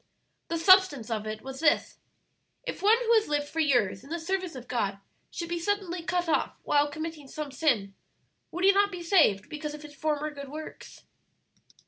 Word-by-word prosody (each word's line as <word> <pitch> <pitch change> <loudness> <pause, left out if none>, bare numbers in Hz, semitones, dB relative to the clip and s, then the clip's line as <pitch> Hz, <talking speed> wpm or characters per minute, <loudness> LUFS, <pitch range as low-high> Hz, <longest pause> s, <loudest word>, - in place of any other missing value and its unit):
The 335 - -2
substance 330 - +5
of 215 -1 -2
it 215 0 -5
was 265 0 -7
this: 315 -1 +1 0.6
'If - - -5
one 430 +3 +5
who 465 - +4
has 440 -1 +4
lived 290 -1 -1
for 320 - -5
years 245 -11 +2
in 275 - -14
the 335 - -2
service 365 -1 -3
of 255 -1 -9
God 200 -5 -1 0.3
should 340 - -5
be 345 0 -2
suddenly 365 -1 -2
cut 355 +1 -1
off 325 - 0
while 290 0 +2
committing 315 -1 -6
some 300 +1 -6
sin, 245 -9 +1 0.6
would 355 +2 -5
he 395 - +8
not 405 +1 +3
be 355 -2 -6
saved, 315 - +3
because 300 0 -5
of 300 - -11
his 295 -1 -11
former 300 +1 -2
good 280 -2 -9
works?'" 310 +2 -9
305 Hz, 190 wpm, -28 LUFS, 275-350 Hz, 0.6 s, he